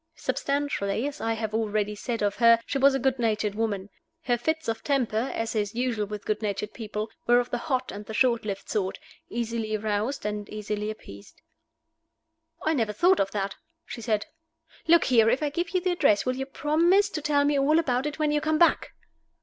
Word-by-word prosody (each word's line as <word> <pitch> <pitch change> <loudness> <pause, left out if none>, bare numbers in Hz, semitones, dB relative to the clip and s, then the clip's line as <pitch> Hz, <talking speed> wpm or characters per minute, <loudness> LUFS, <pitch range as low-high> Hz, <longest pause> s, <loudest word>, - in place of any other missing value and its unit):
Substantially, 275 -6 -1
as 290 - -7
I 225 - 0
have 220 -1 -4
already 210 -1 0
said 225 +1 -3
of 205 -1 0
her, 230 -1 +6
she 275 - -2
was 275 0 +5
a - - 0
good 265 0 0
natured 215 -3 0
woman. 205 -3 -2 0.3
Her 245 -4 +2
fits 315 +7 -2
of 225 0 -2
temper 250 -4 0
(as 225 0 -2
is 210 0 -1
usual 235 -4 -1
with 210 0 -7
good 215 0 -1
natured 210 0 -3
people) 215 -1 -5 0.2
were 240 0 +6
of 245 - -3
the 245 - -1
hot 260 -2 -2
and 205 - -7
the 220 - -6
short 240 -2 +3
lived 200 -2 -5
sort, 195 -3 -1 0.3
easily 230 -2 -2
roused 215 +4 -2
and 210 -1 -3
easily 210 0 -3
appeased. 100 - -11 1.2
"I 315 - +2
never 225 -7 0
thought 355 - +4
of 195 - +1
that," 195 -1 -3 0.3
she 235 - -7
said. 215 -2 0 0.6
"Look 335 +1 +6
here! 230 -3 +4
if 270 - +1
I 295 - 0
give 340 +3 -2
you 370 - +1
the 365 0 +1
address, 275 -12 +3
will 255 0 0
you 265 +1 -4
promise 335 +8 +3
to 310 - -3
tell 290 -1 +2
me 290 -1 +2
all 295 +3 +3
about 265 -4 +1
it 295 - -5
when 305 -1 +1
you 295 0 +1
come 310 0 +1
back?" 340 +1 +3
230 Hz, 205 wpm, -26 LUFS, 210-285 Hz, 1.2 s, her